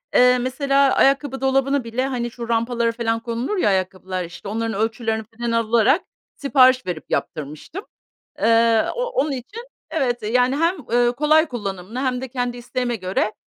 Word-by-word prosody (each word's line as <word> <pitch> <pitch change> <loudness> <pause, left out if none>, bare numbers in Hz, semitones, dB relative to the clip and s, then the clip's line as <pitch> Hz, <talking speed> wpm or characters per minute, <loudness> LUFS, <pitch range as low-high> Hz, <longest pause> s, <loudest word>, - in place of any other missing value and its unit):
Eee, 250 0 +6
mesela 275 +2 +2
ayakkabı 275 -1 +2
dolabını 270 0 +1
bile, 230 +3 -2
hani, 240 -3 -3
şu 235 0 -8
rampalara 230 0 +1
falan 230 -1 -1
konulur 235 - -3
ya 355 - +2
ayakkabılar, 185 -1 -2
işte, 170 +4 -11
onların 225 +2 -2
ölçülerini 220 0 -1
falan 235 0 -2
alarak 230 - +3 0.3
sipariş 255 -2 +4
verip 175 -4 -4
yaptırmıştım. 155 - -4 0.5
Eee, 230 0 +4
o - - -1
onun 480 -11 0
için 380 - -6 0.3
evet, 255 -7 -1
eee, 210 - -2
yani, 250 +2 +3
hem, 335 +5 +1 0.2
ııı, 240 0 +3
kolay 305 +4 +4
kullanımlı 205 -2 -5
hem 255 -2 -1
de 265 - -4
kendi 245 -1 -3
isteğime 245 0 -3
göre, 195 +2 -1
240 Hz, 160 wpm, -21 LUFS, 225-270 Hz, 0.5 s, Eee